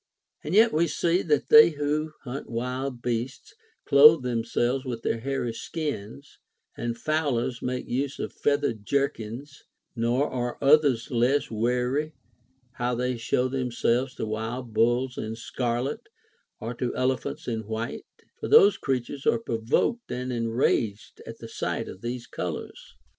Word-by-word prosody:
And 155 +5 -2
yet 225 +2 +6
we 170 +2 +3
see 170 +3 +1
that 150 -3 0
they 225 -5 +9
who 150 0 -2
hunt 135 +1 -6
wild 125 +1 -3
beasts 120 +2 -3 0.3
clothe 150 +1 +7
themselves 120 +2 0
with 120 -4 -5
their 115 - 0
hairy 130 -1 -2
skins; 140 -2 -6 0.4
and 120 0 -3
fowlers 130 -5 -1
make 125 0 -3
use 135 +2 -2
of - - -5
feathered 145 -7 0
jerkins; 140 +1 -2 0.3
nor 120 +5 +1
are 120 -1 -3
others 140 -4 +4
less 125 +4 +2
Avary 125 +7 0 0.6
how 125 0 -2
they 125 +1 -1
show 120 +2 0
themselves 125 0 0
to - - -4
Avild 110 +2 -4
bulls 120 +3 +1
in 110 +1 -4
scarlet 120 +3 -3 0.5
or 115 +3 -4
to 120 0 -3
elephants 130 0 -2
in 110 -3 -3
Avhite; 110 +2 -4 0.4
for - - -4
those 430 -2 +7
creatures 135 +1 -3
are - - +4
provoked 115 - -1
and 125 +1 -3
enraged 115 -3 -1
at - - -8
the - - -9
sight - - -3
of 95 - -10
these 120 0 -4
colors. 90 -3 -6
125 Hz, 140 wpm, -26 LUFS, 115-140 Hz, 0.6 s, they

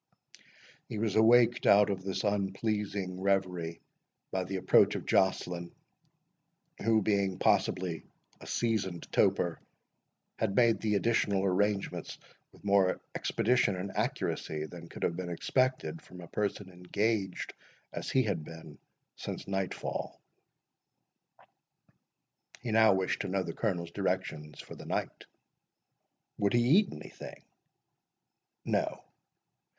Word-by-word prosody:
He - - -4
was 110 -1 -1
waked 115 +2 +5
out 100 0 +6
of 95 -1 -3
this 95 0 -2
unpleasing 100 -1 -1
reverie 90 -4 0 0.5
by 95 -1 -1
the 95 +2 -4
approach 95 - +4
of - - -4
Joceline, 90 -2 +1 1.1
who, 110 -1 +3
being 100 -2 +1
possibly 90 -3 +1 0.4
a - - -11
seasoned 105 -7 -1
toper, - - +2 0.8
had 100 - 0
made 115 -2 +4
the 105 -1 +1
additional 100 -2 +2
arrangements 100 +1 0 0.3
with - - -20
more 100 -2 +3
expedition 120 -3 +2
and 95 +2 -4
accuracy, 75 0 -2
than 85 +1 -10
could - - -8
have 85 - +1
been 90 0 -4
expected 130 - 0
from 90 -10 -13
a 85 - -10
person 100 -1 -3
engaged 95 +2 -1 0.4
as - - -4
he 130 - +3
had 95 -8 -1
been 80 -2 -11 0.4
since - - -6
night 95 -1 -1
fall. - - -5 2.4
He 120 - -3
now 110 -2 +6
wished 95 -1 0
to - - -3
know 95 0 0
the 85 -2 -5
Colonel's 85 -6 -2
directions 85 -6 -3
for - - -11
the - - -10
night. - - -3 1.1
"Would 100 -1 +2
he 120 0 +4 0.2
eat 210 - -1
anything?" - - -10 1.2
"No." - - -1
95 Hz, 125 wpm, -31 LUFS, 90-105 Hz, 2.4 s, out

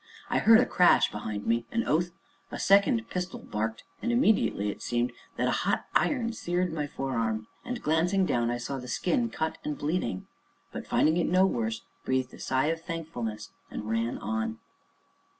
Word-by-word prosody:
I - - +3
heard 225 0 +7
a 250 - +4
crash 180 -1 +4
behind 105 0 -5
me, 115 0 +1
an 235 - +1
oath, 170 +3 +2 0.4
a - - -5
second 220 +4 +4
pistol 180 0 -3
barked, 110 +1 -3 0.2
and 240 - 0
immediately 220 - +2
it - - -11
seemed 120 0 0 0.3
that - - +1
a - - +2
hot - - 0
iron 235 -5 +1
seared 180 -4 -1
my 150 -2 -2
forearm, 115 -6 -2 0.2
and 245 -1 -5
glancing 175 +5 +2
down, 120 -7 +1
I 120 - 0
saw 130 +3 -4
the 125 - -8
skin 230 - 0
cut 160 -7 -3
and 150 -1 -3
bleeding, 145 - -2 0.5
but, - - -7
finding 155 +2 +3
it 175 - +1
no 185 +1 +5
worse, 115 - -1 0.2
breathed 130 -1 -1
a - - -12
sigh 130 +1 +1
of 165 0 -2
thankfulness, 155 -11 -5 0.2
and 105 - -6
ran 115 +1 0
on. 110 0 -2
150 Hz, 180 wpm, -28 LUFS, 115-185 Hz, 0.5 s, heard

